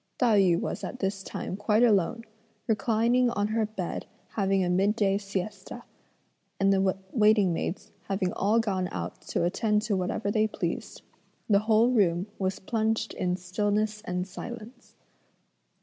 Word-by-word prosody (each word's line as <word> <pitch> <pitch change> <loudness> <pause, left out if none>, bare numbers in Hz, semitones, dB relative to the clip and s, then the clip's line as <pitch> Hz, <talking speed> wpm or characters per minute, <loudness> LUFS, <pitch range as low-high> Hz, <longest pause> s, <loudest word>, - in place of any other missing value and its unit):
Tai 230 -5 +4
yü 175 -3 +4
was - - -4
at - - -5
this 195 -3 -2
time 190 - -5
quite 210 +3 +2
alone, 220 0 +2 0.4
reclining 235 +2 +2
on 205 -2 -1
her 220 -1 0
bed 195 -5 -5 0.2
having 195 -2 +1
a - - 0
midday 195 +2 +2
siesta, 200 +3 -5 0.8
and 195 0 +4
the 190 -1 +2
waiting 210 -5 +4
maids 170 +2 -4 0.2
having 190 -2 -1
all 210 +3 +2
gone 190 -5 -1
out 85 0 -5
to - - -2
attend 210 +4 +1
to 215 -2 0
whatever 185 +2 -1
they 215 0 +2
pleased, - - -4 0.4
the 200 -2 +5
whole 220 +3 +3
room 185 -6 +2
was 190 0 -1
plunged 220 +1 -1
in 180 -1 -1
stillness 205 +3 -1
and 180 -2 -2
silence. 235 +5 -9
205 Hz, 150 wpm, -28 LUFS, 190-220 Hz, 0.8 s, the